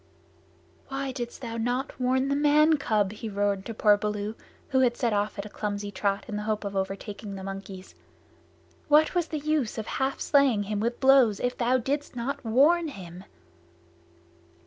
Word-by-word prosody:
"Why 270 0 -3
didst 245 0 -6
thou 230 -1 -4
not 245 +4 -2
warn 260 +1 +2
the 280 - +1
man 300 +2 +4
cub?" 215 -7 +1
he 215 +1 -6
roared 200 -1 -1
to 230 - -4
poor 210 -1 +5
Baloo, 210 0 -3 0.4
who 265 -2 +2
had 245 -2 +2
set 235 -3 0
off 205 +1 -1
at 200 - -4
a - - -6
clumsy 205 -1 -4
trot 200 0 -1
in 210 -3 -4
the - - -3
hope 215 0 -2
of 200 -1 -5
overtaking 200 +1 -4
the 190 - -7
monkeys. 195 -1 -8 0.9
"What 300 +1 +5
was 350 -2 0
the 310 - -3
use 300 -5 -1
of 220 - -3
half 265 +3 -2
slaying 275 -8 +3
him 205 0 -3
with 235 +3 -1
blows 265 -6 +5
if 245 0 -1
thou 250 +1 +2
didst 275 +3 -3
not 250 +4 -3
warn 295 +9 +4
him?" 185 - -9
230 Hz, 180 wpm, -27 LUFS, 205-270 Hz, 0.9 s, poor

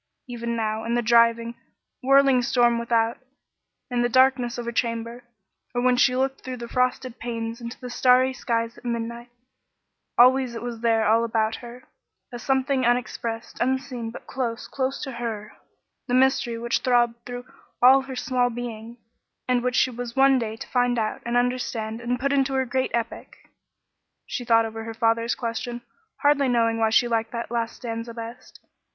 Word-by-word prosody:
Even 235 -1 -4
now, 220 -1 -2
in 230 +1 -1
the 240 - +1
driving, 230 0 +4 0.5
whirling 275 -1 +5
storm 240 -1 +2
without, 230 0 +1 0.7
in 245 -1 +1
the 240 - +2
darkness 255 -1 +3
of 240 - -4
her 235 - -2
chamber, 230 +1 -2 0.5
or 245 - +1
when 250 0 +4
she 250 0 +3
looked 265 +1 -1
through 255 -1 -6
the 235 -1 -7
frosted 250 0 -1
panes 230 0 -4
into 235 +1 -7
the 250 - -7
starry 255 +1 +4
skies 230 -2 -2
at - - -24
midnight, 235 0 -4 0.9
always 255 0 +5
it 230 - -6
was 240 -2 -5
there 225 -1 +2
all 225 +2 +4
about 225 -1 0
her, 245 +1 -11 0.5
a 240 - -6
something 265 +2 +1
unexpressed, 235 -1 -2
unseen, 250 -2 -1
but 225 - -10
close 240 -3 -4
close 265 0 -2
to 270 - -4
her, 225 -3 -5 0.5
the 245 - +1
mystery 255 -2 +2
which 235 +1 0
throbbed 240 -2 +1
through 245 0 -7 0.3
all 260 +2 +7
her 265 0 -8
small 250 -1 +1
being, 235 -1 -7 0.5
and 250 -1 +2
which 250 0 -1
she 255 - +3
was 240 0 -6
one 270 -1 +5
day 220 -2 -3
to - - -9
find 245 -1 +1
out 215 -1 -2
and 240 +1 +1
understand 240 -2 -1
and 245 +1 -2
put 275 +2 0
into 270 -1 +1
her 265 0 +1
great 260 +1 -1
epic. 235 -1 -4 0.9
She 250 - -4
thought 230 -1 +4
over 225 0 -6
her 225 0 -7
father's 230 0 +1
question, 240 0 -4 0.4
hardly 285 -1 +4
knowing 230 -2 +2
why 220 -1 +3
she 230 +2 +4
liked 225 -1 -1
that 235 -1 -4
last 230 -1 -2
stanza 230 -1 -6
best. 230 +1 -9
240 Hz, 175 wpm, -24 LUFS, 230-250 Hz, 0.9 s, all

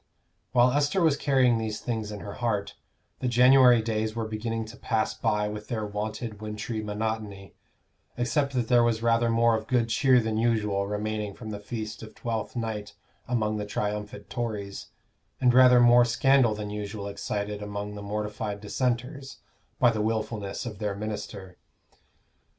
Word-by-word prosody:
While 125 0 +5
Esther 145 +7 +1
was 160 -5 +4
carrying 130 -5 +3
these 110 -1 -3
things 110 -3 -3
in 105 -1 -7
her 100 - -7
heart, 105 -4 -1 0.5
the 130 - -1
January 125 -1 +6
days 110 0 -1
were 115 -1 -2
beginning 110 +1 -3
to 110 +1 -11
pass 110 -1 0
by 105 0 0
with 105 0 -6
their 110 -3 -2
wonted 105 +1 -5
wintry 110 +1 -4
monotony, 105 -2 -4 0.6
except 135 +4 0
that 125 -3 0
there 120 0 +5
was 115 -1 +1
rather 115 0 +3
more 115 0 +4
of 110 0 -4
good 120 -3 +1
cheer 130 +1 +4
than 110 -1 -1
usual 105 -4 +1
remaining 105 0 -3
from 110 -2 -8
the 105 - -5
feast 110 0 -6
of 110 - -11
Twelfth 115 -1 -4
Night 110 -3 -4 0.3
among 110 -3 0
the 105 - -3
triumphant 105 0 -4
Tories, 105 -5 -4 0.5
and 125 -1 +4
rather 125 -1 +7
more 120 0 +7
scandal 120 -1 +3
than 105 -1 -5
usual 105 0 -5
excited 105 +1 -4
among 105 0 -5
the 105 - -7
mortified 105 0 -4
Dissenters 130 +5 -3 0.4
by 120 -2 +5
the 110 -2 -2
wilfulness 110 -2 -2
of 105 -4 -6
their 105 -2 -2
minister. 100 -2 -6
110 Hz, 160 wpm, -27 LUFS, 105-120 Hz, 0.6 s, rather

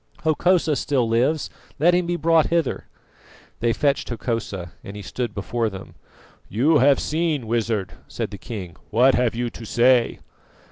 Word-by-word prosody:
Hokosa 160 0 +2
still 135 -5 0
lives, 130 +7 +1 0.3
let 170 +5 +4
him 175 -1 +1
be 175 - 0
brought 165 -2 +3
hither." 165 -5 -1 0.7
They 115 0 +2
fetched 140 +3 0
Hokosa, 110 -7 -4
and 100 - -9
he 105 - -7
stood 115 +3 -4
before 115 +3 -1
them. 95 -2 -10 0.6
"You 145 +9 +3
have 140 +2 +5
seen, 155 -5 -1
Wizard," 110 -3 -1
said - - -4
the - - -8
king. 95 -8 -7
"What 125 +4 +4
have 125 -2 +1
you 120 0 -2
to 115 - -10
say?" 120 +2 +3
125 Hz, 155 wpm, -23 LUFS, 115-155 Hz, 0.7 s, have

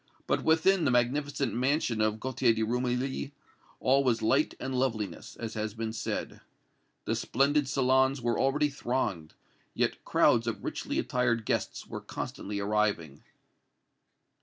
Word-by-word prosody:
But - - 0
within 165 +3 +4
the 140 - +3
magnificent 135 +3 +1
mansion 125 -2 +1
of 110 0 +1
Gaultier 125 -1 +1
de 110 - 0
Rumilly 125 +4 -1 0.5
all 135 +2 +3
was 120 -4 +1
light 135 +7 +2
and 130 0 -4
loveliness, 110 -8 -2
as 115 -1 -6
has 110 -1 -3
been 110 -1 -3
said. 110 - -4 0.6
The - - 0
splendid 140 0 +1
salons 130 +1 +3
were 120 -1 0
already 145 +2 +2
thronged, 110 - -2 0.4
yet - - 0
crowds - - +3
of - - -3
richly - - -3
attired 120 -3 0
guests - - -2
were - - -7
constantly 100 0 -5
arriving. 100 -8 0
125 Hz, 135 wpm, -29 LUFS, 110-135 Hz, 0.6 s, within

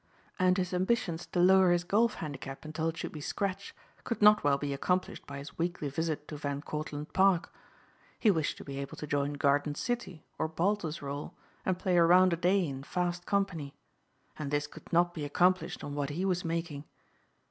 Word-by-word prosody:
And 185 0 +4
his 180 -1 -1
ambitions 180 -3 0
to 180 - -2
lower 190 +1 +6
his 175 0 +3
golf 215 +5 +2
handicap 140 -2 -7
until 160 +1 -1
it 165 - -6
should - - -4
be 155 - -8
scratch 195 +4 -3 0.3
could 230 - -3
not 210 0 +6
well 140 -1 +3
be 140 0 -3
accomplished 180 +6 -1
by 140 - -6
his 140 +3 -10
weekly 170 -3 -1
visit 155 +1 -2
to 150 - -5
Van 145 0 -3
Cortlandt 150 -1 -5
Park. 190 -2 +3 0.6
He 215 - +4
wished 160 -5 -1
to - - -9
be 140 -1 -6
able 140 -1 -6
to - - -5
join 145 0 0
Garden 145 +1 +1
City 210 -6 -3
or 160 - 0
Baltusrol 160 -5 -2 0.3
and 185 -1 +2
play 185 -1 +1
a 170 - +7
round 180 +1 +6
a - - +3
day 180 +3 +2
in 135 -1 -5
fast 175 +4 -2
company. 180 -8 -1 0.6
And 150 -2 -3
this 145 0 0
could 150 - -13
not 175 0 +3
be 155 - -5
accomplished 180 +5 +1
on 145 - -5
what 145 -1 -2
he 170 +6 -2
was 180 -2 0
making. 165 -3 -3
165 Hz, 195 wpm, -31 LUFS, 145-185 Hz, 0.6 s, a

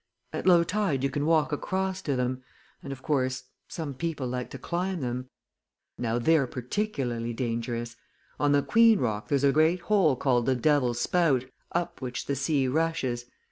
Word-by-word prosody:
At - - -3
low 175 -2 +7
tide 185 -7 0
you 140 - +1
can 145 0 -1
walk 160 -2 +3
across 190 +5 -2
to 140 - -1
them. 125 0 -1 0.4
And 140 - -7
of 130 -1 -8
course, 130 -3 0 0.2
some 155 -5 -5
people 155 -1 -3
like 125 0 -3
to - - -7
climb 180 0 -2
them. 125 0 -3 0.7
Now, 115 -1 -1
they're 145 +2 +3
particularly 125 - -3
dangerous! 115 0 -3 0.4
On 145 -1 +3
the 145 -1 +3
Queen 230 -1 +5
rock 110 - -2
there's 140 -1 +1
a 140 - +5
great 160 +4 +3
hole 190 -8 +3
called 125 -2 +1
the 130 - +3
Devil's 125 -2 +2
Spout, 145 -5 +2 0.3
up 175 -3 -2
which 125 -1 -4
the 140 - -1
sea 140 0 +1
rushes. 130 -5 -1
140 Hz, 175 wpm, -27 LUFS, 125-165 Hz, 0.7 s, low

